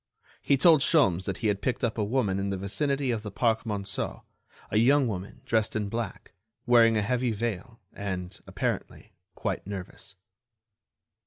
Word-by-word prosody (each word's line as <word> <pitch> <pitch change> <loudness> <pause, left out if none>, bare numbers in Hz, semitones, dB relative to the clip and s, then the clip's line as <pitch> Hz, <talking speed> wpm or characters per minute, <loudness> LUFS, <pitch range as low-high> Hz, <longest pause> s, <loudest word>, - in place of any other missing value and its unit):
He 140 - +3
told 155 +1 +6
Sholmes 95 - +3
that - - -3
he - - +4
had 100 -1 0
picked 130 - -2
up 115 -1 0
a - - +2
woman 105 -3 0
in 100 0 -1
the 100 - -2
vicinity 135 +7 0
of 115 -2 -2
the 105 - -6
Parc 110 +3 0
Monceau, 100 -2 -3 0.5
a - - +2
young 135 +4 +4
woman 100 -3 -6
dressed 110 -1 +1
in 105 -2 -1
black, 115 +1 -5 0.3
wearing 115 -2 +5
a 105 - +1
heavy 125 +2 0
veil, 115 +1 -4
and, 95 -3 -5
apparently, - - -4 0.2
quite - - -3
nervous. 100 0 -8
110 Hz, 165 wpm, -28 LUFS, 100-125 Hz, 0.5 s, told